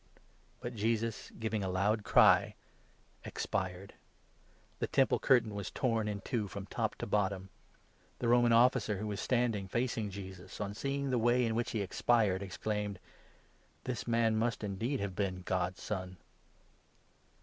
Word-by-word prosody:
But 120 Hz, -, -4 dB
Jesus, 115 Hz, 0 st, -1 dB
giving 110 Hz, -2 st, -2 dB
a 95 Hz, -, -1 dB
loud 100 Hz, +4 st, +1 dB
cry, -, -, +5 dB, 0.7 s
expired. 95 Hz, +1 st, -3 dB, 0.9 s
The -, -, 0 dB
Temple -, -, +3 dB
37, -, -, -10 dB
curtain 120 Hz, -5 st, +4 dB
was 100 Hz, -2 st, -4 dB
torn 115 Hz, -4 st, 0 dB
in 100 Hz, -1 st, -3 dB
two 115 Hz, -3 st, -2 dB
from 100 Hz, +1 st, -7 dB
top -, -, -2 dB
to -, -, -5 dB
bottom. 95 Hz, -2 st, 0 dB, 0.7 s
The -, -, -4 dB
39 115 Hz, -, +3 dB
Roman 120 Hz, -1 st, +5 dB
Officer, 115 Hz, -3 st, +4 dB
who 105 Hz, -, -4 dB
was 105 Hz, 0 st, -3 dB
standing 120 Hz, -6 st, +1 dB
facing 115 Hz, 0 st, -1 dB
Jesus, 95 Hz, -1 st, -9 dB
on 100 Hz, -1 st, -3 dB
seeing 140 Hz, +4 st, -2 dB
the 125 Hz, -, +2 dB
way 120 Hz, +2 st, +3 dB
in 115 Hz, -, 0 dB
which 120 Hz, +1 st, -1 dB
he 110 Hz, -, -1 dB
expired, 100 Hz, -1 st, +2 dB
exclaimed: 105 Hz, +2 st, -3 dB, 0.5 s
" -, -, -35 dB
This 125 Hz, -2 st, -4 dB
man 115 Hz, -1 st, +2 dB
must 115 Hz, 0 st, 0 dB
indeed 110 Hz, +7 st, -2 dB
have 100 Hz, -2 st, -3 dB
been 95 Hz, -2 st, -2 dB
' -, -, -29 dB
God's 90 Hz, 0 st, -1 dB
Son 95 Hz, -3 st, -4 dB
105 Hz, 160 wpm, -33 LUFS, 95-115 Hz, 0.9 s, cry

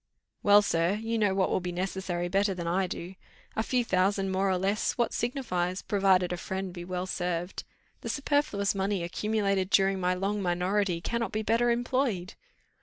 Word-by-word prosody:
"Well, 205 Hz, 0 st, +6 dB
sir. 170 Hz, -1 st, +1 dB
You 225 Hz, +1 st, -2 dB
know 205 Hz, -3 st, +2 dB
what 190 Hz, -1 st, +1 dB
will -, -, +2 dB
be 180 Hz, 0 st, -4 dB
necessary 180 Hz, -1 st, -2 dB
better 195 Hz, +2 st, +1 dB
than 175 Hz, -1 st, -5 dB
I 185 Hz, +3 st, +1 dB
do. 175 Hz, +1 st, -6 dB, 0.4 s
A -, -, +1 dB
few 245 Hz, +1 st, 0 dB
thousands 195 Hz, 0 st, +1 dB
more 190 Hz, +1 st, +1 dB
or 185 Hz, -, +2 dB
less, 195 Hz, +3 st, 0 dB
what 240 Hz, -2 st, 0 dB
signifies, 185 Hz, -8 st, -2 dB
provided 190 Hz, -3 st, +2 dB
a -, -, -3 dB
friend 190 Hz, +1 st, -4 dB
be 175 Hz, -1 st, -7 dB
well 180 Hz, +1 st, -3 dB
served. 175 Hz, -1 st, -3 dB, 0.4 s
The -, -, -6 dB
superfluous 280 Hz, -9 st, +1 dB
money 195 Hz, -2 st, -1 dB
accumulated 195 Hz, +1 st, 0 dB
during 195 Hz, -1 st, +3 dB
my 180 Hz, 0 st, +1 dB
long 200 Hz, +3 st, -1 dB
minority 180 Hz, 0 st, 0 dB
cannot 235 Hz, +4 st, -2 dB
be 215 Hz, +1 st, -2 dB
better 230 Hz, +3 st, +2 dB
employed." 235 Hz, -5 st, 0 dB
195 Hz, 180 wpm, -29 LUFS, 180-210 Hz, 0.4 s, Well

